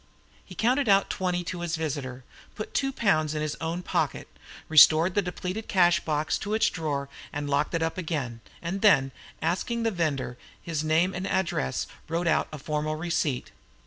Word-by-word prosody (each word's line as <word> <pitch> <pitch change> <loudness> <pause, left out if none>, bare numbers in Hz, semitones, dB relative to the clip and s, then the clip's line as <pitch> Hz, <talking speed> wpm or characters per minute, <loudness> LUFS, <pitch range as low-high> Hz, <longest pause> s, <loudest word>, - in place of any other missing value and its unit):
He 185 - -12
counted 250 +5 +2
out 195 0 +4
twenty 180 -1 -1
to 175 0 -5
his 170 -1 -1
visitor, 140 -5 -4 0.3
put 215 - -6
two 270 -1 +1
pounds 155 - +1
in 150 - -1
his 155 -1 -2
own 165 +2 -2
pocket, - - -1 0.4
restored 160 +3 +7
the 205 - +3
depleted 185 +3 -4
cashbox 170 -4 +2
to 210 +2 -2
its 220 - +3
drawer 145 -4 -2 0.2
and 145 0 -4
locked 145 +4 +1
it 165 - +1
up 165 +3 -2
again, 140 -9 -3 0.2
and 190 +4 -3
then, 140 -11 +5 0.3
asking 190 +8 -1
the 225 - +1
vendor 145 - -2 0.2
his 160 -2 -3
name 160 +4 +2
and 185 +2 -3
address, 170 - 0 0.2
wrote 170 +2 -1
out 165 - +2
a 155 - -6
formal 150 +1 -2
receipt. 155 -5 -1
165 Hz, 175 wpm, -27 LUFS, 150-185 Hz, 0.4 s, restored